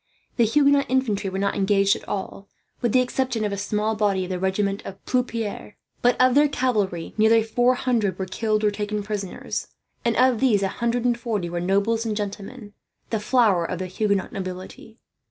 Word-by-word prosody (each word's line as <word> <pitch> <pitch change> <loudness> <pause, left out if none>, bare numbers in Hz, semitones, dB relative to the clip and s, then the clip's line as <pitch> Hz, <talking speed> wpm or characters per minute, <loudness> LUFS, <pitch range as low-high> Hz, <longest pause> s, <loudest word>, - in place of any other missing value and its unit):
The 235 - +5
Huguenot 280 +3 +3
infantry 235 -7 0
were 190 - -4
not 200 +1 0
engaged 200 0 +3
at - - -10
all, 195 0 -5 0.3
with 240 - +1
the 255 - +4
exception 250 -3 -1
of 205 - -1
a - - -1
small 210 +2 -1
body 200 -3 +1
of 185 - -5
the 180 - -2
regiment 195 +1 -1
of 195 - -8
Plupiart. 230 -5 -2 0.3
But 245 0 +3
of 255 0 +5
their 295 +2 +5
cavalry 210 - -1
nearly 220 +1 +5
four 245 +3 +2
hundred 225 -8 0
were 190 - -3
killed 215 +3 -1
or 210 - +3
taken 210 0 -3
prisoners, 200 -2 -4 0.4
and 235 -1 +1
of 255 -2 +3
these 220 -7 +3
a 195 - +1
hundred 235 +1 0
and 240 -1 +3
forty 210 -7 -2
were 175 0 -2
nobles 200 +5 +1
and 220 -2 -2
gentlemen, 205 +2 -6 0.4
the 220 - 0
flower 210 -6 +3
of 180 +2 -3
the 185 - -4
Huguenot 200 +1 -1
nobility. 185 +4 -7
210 Hz, 190 wpm, -24 LUFS, 195-240 Hz, 0.4 s, The